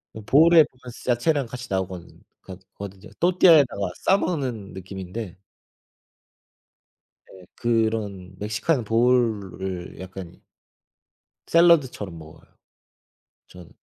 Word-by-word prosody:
그 110 - -7
보울에 160 +8 +6
보면 125 -3 -12
쓰 120 - -9
야채랑 140 +4 +1
같이 125 +1 -8
나오거는 95 -2 -5 0.2
거드 95 0 -12
거든요. 100 0 -10
또띠아에다가 160 - +4
싸 195 - +3
먹는 130 - -3
느낌인데 95 +1 -7 2.0
예 95 -1 -15
그런 110 -5 -1
멕시칸 110 +7 -1
보울을 105 -7 0
약간 95 -2 -9 1.1
샐러드처럼 145 - +3
먹어요 80 -1 -14 1.0
저는. 90 -2 -14
110 Hz, 240 characters per minute, -24 LUFS, 95-130 Hz, 2.0 s, 보울에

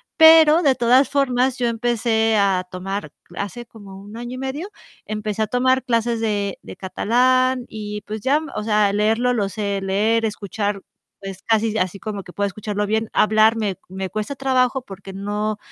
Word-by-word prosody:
pero 320 0 +7
de 275 -5 +3
todas 255 +2 +4
formas 260 -2 +1
yo 245 -1 0
empecé 225 -1 +1
a 195 -2 +2
tomar 185 -2 -5 0.2
hace 205 +4 -5
como 200 -4 -13
1 205 +2 -12
año 240 +2 -6
y - - -7
medio, 270 +8 -4 0.4
empecé 215 0 -3
a 215 - +1
tomar 260 +3 +2
clases 235 -2 0
de 205 -3 -1
de - - -10
catalán 255 +6 +1
y 210 -1 -6
pues 215 +1 -7
ya, 275 +7 +2 0.2
o - - -3
sea, 210 -2 +2
leerlo 225 +4 +2
lo 205 -5 0
sé 200 -1 -3
leer, 210 +4 +1
escuchar 205 -1 -3 0.4
es 195 -1 -8
casi 225 -1 +1
así 185 +1 -2
como 210 -2 -5
que 180 - -12
puedo 205 - -1
escucharlo 210 +1 -3
bien, 220 +1 -1
hablar 220 +1 +4
me 210 -4 -2
me 190 0 -5
cuesta 215 +7 -4
trabajo 260 -1 +1
porque 195 -2 -10
no 205 +2 -3
220 Hz, 175 wpm, -21 LUFS, 200-245 Hz, 0.4 s, pero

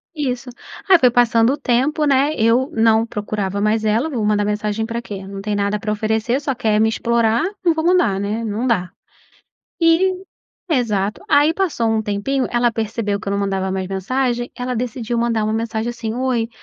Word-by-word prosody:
Isso 260 -4 -3 0.4
aí 370 -2 +7
foi 250 - +5
passando 235 0 +3
o - - -3
tempo, 270 +6 +1
né, 280 +1 +3
eu 240 +3 +2
não 225 0 +3
procurava 205 -3 -3
mais 215 +1 +1
ela, 225 +8 +1
vou 245 -8 -2
mandar 210 0 +2
mensagem 210 +1 -1
pra 230 +1 -4
quê? 195 -4 -8
Não 195 0 -7
tem 210 +1 -2
nada 205 +1 0
pra 210 +1 -3
oferecer 220 +4 0
só 280 -1 -1
quer 215 -3 +1
me 220 - +4
explorar, 230 0 +1 0.2
não 345 -2 +4
vou 320 0 -2
mandar 350 - +3
né, 210 +3 -2
não 225 +3 -2
dá. 185 -7 0 0.9
E 365 +3 +3 0.5
exato, 210 -8 0
aí 290 +2 +4
passou 330 - 0
um 220 0 +1
tempinho, 215 +6 -1
ela 240 0 +2
percebeu 220 -2 -2
que - - -12
eu - - -1
não 200 - 0
mandava 190 -1 -1
mais 190 -1 -3
mensagem, 240 +5 -2
ela 250 0 -3
decidiu 240 0 -3
mandar 230 -2 0
uma 215 0 0
mensagem 225 +1 -2
assim, 230 -2 -5
"Oi, 245 -2 -1
230 Hz, 190 wpm, -19 LUFS, 210-255 Hz, 0.9 s, aí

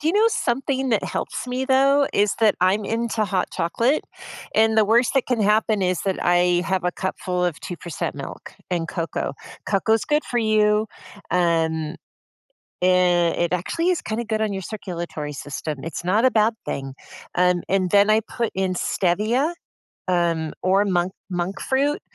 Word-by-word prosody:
Do 305 - -4
you 355 - +1
know 435 +2 +5
something 265 - -1
that 215 - +2
helps - - -4
me, 255 +1 -2
though, 275 +1 +4
is 205 0 +2
that 220 -2 +5
I'm 195 +3 +2
into 225 0 -1
hot 185 -2 -1
chocolate, 230 - 0 0.5
and 220 0 +4
the 215 - +5
worst 235 +5 +3
that 270 - +2
can 245 -3 0
happen 210 0 +2
is 180 -1 0
that 195 -1 -1
I 175 0 +3
have 185 +1 -1
a 180 - +1
cup 190 - -3
full 180 -1 -1
of 170 -4 -1
2% 170 -2 -5
milk - - -8 0.2
and 170 -2 -1
cocoa. 165 -5 -3 0.3
Cocoa's 220 +2 +1
good 300 0 +1
for 240 - -1
you, 215 -1 +3 0.4
um 165 -2 +1 0.9
i - - +4
i - - +5 0.5
it 175 - -1
actually 330 - 0
is 360 - +1
kinda 225 +2 -3
good 220 -1 -1
on 215 -2 0
your 190 - -4
circulatory 170 -6 -5
system. 145 +1 -5
It's 165 +1 -5
not 210 +7 +2
a 260 - +5
bad 220 +1 +3
thing, 135 -1 -4 0.4
um, 180 -1 +3
and 185 -1 +1
then 205 +1 +5
I 215 +1 +5
put 230 +1 -3
in 190 -1 0
Stevia, 215 - 0 0.5
um, 170 -3 0
or 195 +2 +3
monk 180 -1 0 0.2
monk 180 +2 -3
fruit. 280 +3 0
200 Hz, 175 wpm, -23 LUFS, 175-230 Hz, 0.9 s, know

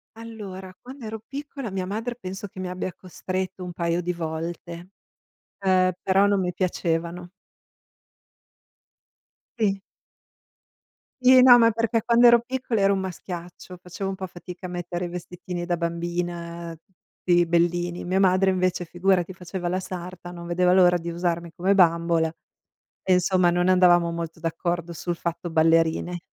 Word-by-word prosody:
Allora, 205 -5 -8
quando 255 -1 -11
ero 220 +1 -5
piccola 275 -5 -6
mia 185 -1 -3
madre, 225 +5 -3
penso, 195 -3 -7
che 185 - -12
mi 185 - -3
abbia 180 0 -4
costretto 185 +1 -5
un 180 - -6
paio 170 0 -1
di 180 +1 -2
volte. 170 +1 -6 0.7
Ehm, 185 -1 +3
però 195 +1 +4
non 200 -1 +2
mi 180 - -1
piacevano. 175 -1 -2 2.3
Sì. 195 -3 +1 1.4
Sì, 255 0 +7
no, 250 -1 +9
ma 230 -1 +5
perché 230 +1 0
quando 240 0 +5
ero 235 -1 +7
piccola 250 -3 -2
ero 195 0 +4
un 195 - 0
maschiaccio, 180 -1 -7
facevo 185 +2 -5
un 195 - -3
po' 190 -1 -6
fatica 180 +1 -10
a - - -5
mettere 175 0 -4
i - - -3
vestitini 180 0 -6
da 175 -1 -1
bambina, 170 0 -4
tutti 175 -1 -1
bellini. 175 +1 0
Mia 185 +2 0
madre, 190 0 +4
invece, 185 -1 0
figurati, 180 +1 +1
faceva 180 0 -5
la 185 +1 0
sarta, 180 -1 -7
non 170 -1 -9
vedeva 180 +1 +2
l'ora 180 -1 +5
di 170 0 -6
usarmi 170 0 -2
come 190 +2 +2
bambola, 170 -2 +3 0.8
e 190 - +1
insomma 180 0 +3
non 175 +1 +1
andavamo 175 -2 +5
molto 170 0 -5
d'accordo 170 +1 -2
sul 170 +1 -4
fatto 170 +1 -4
ballerine. 165 +2 +2
180 Hz, 150 wpm, -24 LUFS, 170-190 Hz, 2.3 s, no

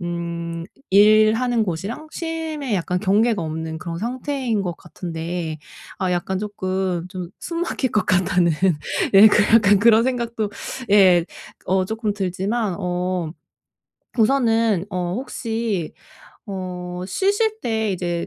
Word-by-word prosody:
음 170 -1 -4 0.3
일하는 215 +4 +5
곳이랑 200 - -5
쉼에 325 -2 -4 0.2
약간 180 -1 -1
경계가 210 +1 +2
없는 160 0 -4
그런 170 0 -5
상태인 245 - -2
것 175 -2 -4
같은데 165 -1 -5 0.4
아 185 -1 0
약간 185 +2 -1
쪼끔 185 -3 -2
좀 180 -2 -6
'숨 335 -1 -4
막힐 265 -6 -1
것 210 - +2
같다.'는 180 -2 +2 0.6
예 205 +3 +10 0.3
약간 205 -3 +6
그런 225 +1 +5
생각도 235 -4 -2 0.4
예 185 -4 +6 0.4
어 185 +1 +2
쪼끔 220 +1 -2
들지만 195 +1 -2
어 180 -2 -2 0.9
우선은 225 -5 +2
어 180 -2 -2
혹시 225 - -3 0.5
어 180 -2 -5
쉬실 410 - 0
때 220 -3 -1
이제 175 -2 -2
195 Hz, 215 characters per minute, -22 LUFS, 175-230 Hz, 0.9 s, 예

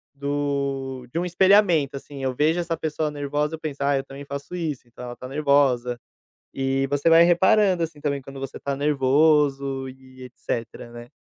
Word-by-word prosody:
do 140 -2 -3
de - - -4
um 175 - -1
espelhamento 180 -5 +3
assim. 140 0 -10
Eu 130 -1 -1
vejo 155 +5 +2
essa 170 -1 -2
pessoa 155 0 -2
nervosa 145 +2 -2
eu - - -13
penso, 145 -3 -5
ai 140 -1 +2
eu - - -5
também 135 +1 -10
faço 140 +5 -7
isso 155 -8 -4
e - - -27
tal. 125 - -9
Ela 120 0 -7
tá 130 - -9
nervosa. 135 -4 +1 0.5
E 135 0 0
você 145 +3 +1
vai 165 +1 +7
reparando 185 +2 +4
assim 160 -2 -5
também 140 -1 -2
quando 135 +1 -10
você 135 0 -7
tá 140 0 -3
nervoso 140 -1 +2
e 130 0 -14
etcétera 120 -1 -6
né. 120 0 -11
140 Hz, 185 wpm, -24 LUFS, 135-155 Hz, 0.5 s, vai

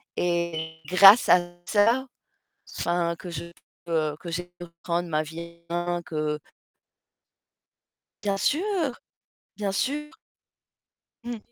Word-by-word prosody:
et 170 -2 -1
grâce 195 +5 +8
à 180 - +8 0.3
ça, 230 +5 +3 0.7
enfin 170 -1 0
que 180 - -9
je 170 - -5 0.4
peux 155 -3 0
que 170 - -7
j'ai 175 +2 -3
pu 175 - -7
reprendre 170 +1 -3
ma 155 -1 +1
vie 170 +2 -9
en 175 0 -1
main, 175 0 -1
que 155 -2 -2 1.9
Bien 200 -1 +1
sûr! 320 - 0 0.6
Bien 205 -2 -1
sûr. 295 +8 -1 1.1
Mmh. 240 -2 -4
175 Hz, 115 wpm, -26 LUFS, 170-205 Hz, 1.9 s, grâce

